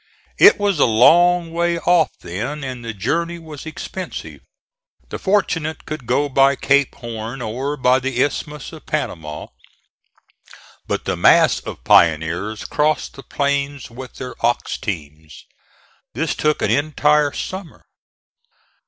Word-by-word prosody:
It - - +8
was 200 -5 +1
a - - +6
long 170 +9 +4
way 170 0 +1
off 170 -1 +3
then, 120 - -5
and 130 -2 -6
the 115 - -4
journey 165 - -2
was 160 -3 -10
expensive. 180 +3 -7 0.7
The - - -6
fortunate 165 -6 0
could 155 -6 -7
go 140 +4 +1
by 135 0 +4
Cape 140 0 +2
Horn 115 0 -6
or 130 +6 -3
by 130 0 +3
the 130 -1 -3
Isthmus 150 +2 -4
of 160 - -12
Panama; 80 - -4 1.4
but - - -2
the - - -1
mass - - +5
of - - -9
pioneers 85 +6 +2
crossed 150 -2 0
the 135 - -11
plains 140 0 -2
with 130 +2 -10
their 125 -1 -7
ox 120 +1 0
teams. 80 - -7 0.7
This - - -1
took 150 0 0
an - - +1
entire 150 0 +2
summer. 185 +4 -7
140 Hz, 135 wpm, -20 LUFS, 115-155 Hz, 1.4 s, It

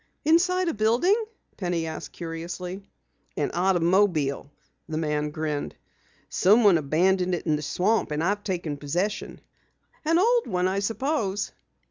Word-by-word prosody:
"Inside 365 +3 +3
a 330 - +1
building?" 235 - +3 0.4
Penny 175 -3 -1
asked 160 -1 -6
curiously. 175 +3 -6 0.6
"An - - 0
automobile," 175 -5 +2 0.4
the 155 - -2
man 150 -1 -1
grinned. 150 -1 -3 0.5
"Someone 205 -3 +5
abandoned 180 +5 +2
it - - -6
in 155 -3 +2
the 150 - -3
swamp 195 +9 +1
and 150 +1 -1
I've 205 +3 0
taken 170 -7 -3
possession." 175 +9 -3 0.6
"An 325 +2 +3
old 470 +5 +3
one, 180 0 0
I 190 +1 0
suppose." 220 -1 -1
180 Hz, 130 wpm, -26 LUFS, 160-215 Hz, 0.6 s, Someone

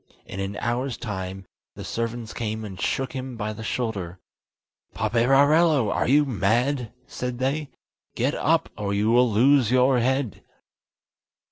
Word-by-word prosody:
In 95 - -7
an 95 +1 -3
hour's 120 +2 -2
time, 95 -4 -5 0.3
the - - -8
servants 115 0 -4
came 110 -1 -4
and 95 -3 -8
shook 135 -1 -1
him 130 -2 -6
by 110 -1 -3
the 110 - -8
shoulder. 100 -7 -3 0.8
"Paperarello, 135 +4 +3
are - - 0
you 145 +4 +4
mad?" 120 +2 0
said 125 -1 -5
they. 135 +3 -1 0.5
"Get - - 0
up, - - +1
or 100 -1 -2
you 105 +2 +2
will 125 +1 +4
lose 125 +2 +4
your 130 +1 +4
head." 130 -2 -1
120 Hz, 140 wpm, -24 LUFS, 105-130 Hz, 0.8 s, you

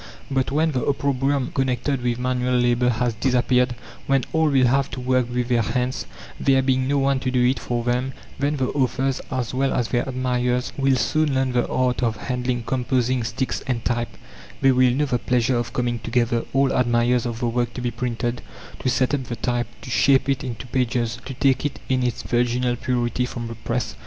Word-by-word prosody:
But 135 -1 +1
when 155 +3 +2
the 130 -4 -1
opprobrium 140 -1 0
connected 130 0 0
with 120 -1 0
manual 125 0 0
labor 120 0 +3
has 120 0 0
disappeared, 125 +1 +2 0.3
when 135 -2 +3
all 160 -1 +3
will 135 -3 +4
have 135 +2 +2
to - - -6
work 125 -1 +1
with 125 -1 -1
their 120 -2 +3
hands, 125 - -2 0.3
there 135 -1 +3
being 130 0 +1
no 140 +1 +1
one 135 -1 +2
to 130 - -2
do 125 -1 +2
it 130 +2 +2
for 120 -1 -2
them, 125 +2 0 0.3
then 145 +2 +1
the 130 -1 0
authors 135 -1 0
as 130 -2 -2
well 135 +1 +1
as 120 -2 0
their 120 +2 0
admirers 125 -1 -1
will 135 -1 +2
soon 155 +2 +1
learn 130 -1 +1
the 120 -1 +1
art 125 -1 +1
of 115 -2 0
handling 125 -1 -2
composing 125 0 0
sticks 125 +3 -2
and 120 -3 -2
type; 120 -1 -2 0.4
they 135 0 +5
will 130 0 +4
know 135 +5 +1
the 125 -3 0
pleasure 125 +1 +1
of 120 0 -2
coming 120 -1 -1
together 115 0 0
all 135 0 +2
admirers 120 0 +2
of 115 -1 -4
the 120 0 -1
work 120 +1 0
to - - -4
be 120 -1 -1
printed 120 +1 -2 0.4
to 130 - 0
set 130 +1 +1
up 135 -3 0
the 120 - -4
type, 120 -1 -1 0.2
to 125 - -7
shape 135 +7 +4
it 135 -1 0
into 125 -1 -5
pages, 120 -3 -1
to 135 - -6
take 130 0 +2
it 145 -2 -3
in 130 -1 +2
its 125 -1 -1
virginal 120 +1 +1
purity 125 0 -1
from 120 -2 -5
the 115 - -6
press. 115 +1 -3
125 Hz, 205 wpm, -23 LUFS, 120-130 Hz, 0.4 s, they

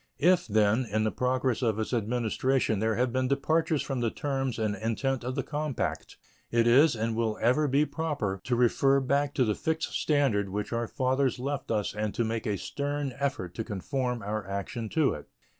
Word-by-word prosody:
If, 175 +3 +3
then, 110 +3 +3
in 110 +1 +1
the 110 - +1
progress 125 -1 0
of 110 -4 +1
its 110 +3 -3
administration 120 0 0
there 110 +1 +1
have 125 -1 0
been 130 0 +1
departures 155 +3 +1
from 135 -2 -3
the 120 -1 +1
terms 135 -1 -2
and 110 -2 0
intent 115 +5 -1
of 125 +1 -3
the 135 - -1
compact, 150 -3 -3 0.3
it 115 0 +2
is 135 +4 +6
and 115 0 -1
will 110 -2 0
ever 135 +6 +3
be 140 +3 +3
proper 145 - -2
to 125 - +1
refer 135 +3 +3
back 140 +2 0
to 130 - +3
the 105 - +1
fixed 160 +7 -2
standard 135 -10 +1
which 105 +4 -3
our 115 0 -1
fathers 130 +2 0
left 140 +2 -3
us 105 -3 0
and 105 0 -3
to 120 - +1
make 115 0 -2
a 105 -2 0
stern 145 +3 -3
effort 135 -11 -2
to 110 - -3
conform 125 +3 -3
our 105 +1 -2
action 100 +4 -4
to 155 +1 +2
it. 75 - -9
125 Hz, 195 wpm, -28 LUFS, 110-140 Hz, 0.3 s, is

